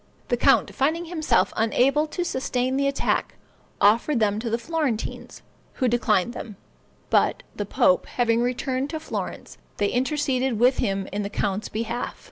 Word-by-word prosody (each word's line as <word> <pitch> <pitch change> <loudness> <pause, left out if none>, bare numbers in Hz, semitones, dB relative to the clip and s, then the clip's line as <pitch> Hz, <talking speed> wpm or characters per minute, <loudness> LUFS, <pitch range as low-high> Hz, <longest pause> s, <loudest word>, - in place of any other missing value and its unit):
The 245 - +3
count, 270 +3 +3
finding 315 +5 0
himself 325 -2 +1
unable 270 +7 +2
to 355 +3 -3
sustain 260 -3 -1
the 275 0 +1
attack, 275 - -1 0.4
offered 230 +6 +3
them 210 -1 +1
to 230 +1 -3
the 230 - +1
Florentines, 290 -4 -3 0.3
who 255 - 0
declined 235 -3 +1
them; 220 -4 -7 0.6
but - - +2
the 205 - -4
pope 185 -2 +3
having 235 -1 +1
returned 255 +2 -1
to 315 - -4
Florence, 315 - -6 0.2
they 205 -1 +1
interceded 265 -2 0
with 250 +2 +4
him 195 -1 -1
in 205 - -1
the 200 - -3
count's 205 0 -2
behalf. 230 +2 -3
245 Hz, 155 wpm, -24 LUFS, 220-275 Hz, 0.6 s, with